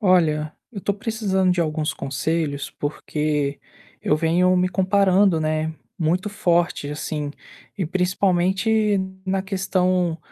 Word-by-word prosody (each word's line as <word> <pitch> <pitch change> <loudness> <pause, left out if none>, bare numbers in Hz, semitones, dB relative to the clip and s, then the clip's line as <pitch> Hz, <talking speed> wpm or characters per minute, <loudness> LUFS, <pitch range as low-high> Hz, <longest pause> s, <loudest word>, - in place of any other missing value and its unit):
Olha, 160 -6 +3 0.2
eu 210 -5 -7
tô 200 - 0
precisando 200 -3 0
de 180 - 0
alguns 155 -1 0
conselhos, 145 +1 -2
porque 150 -1 -2 0.4
eu 150 - +2
venho 170 +3 +3
me 180 0 +2
comparando, 190 -1 +3
né, 155 0 0 0.3
muito 180 +5 0
forte 175 -6 0
assim, 150 -1 -3 0.5
e 185 -6 -1
principalmente 190 +4 +2 0.3
na 190 0 0
questão, 185 -3 0
180 Hz, 115 wpm, -23 LUFS, 155-190 Hz, 0.5 s, Olha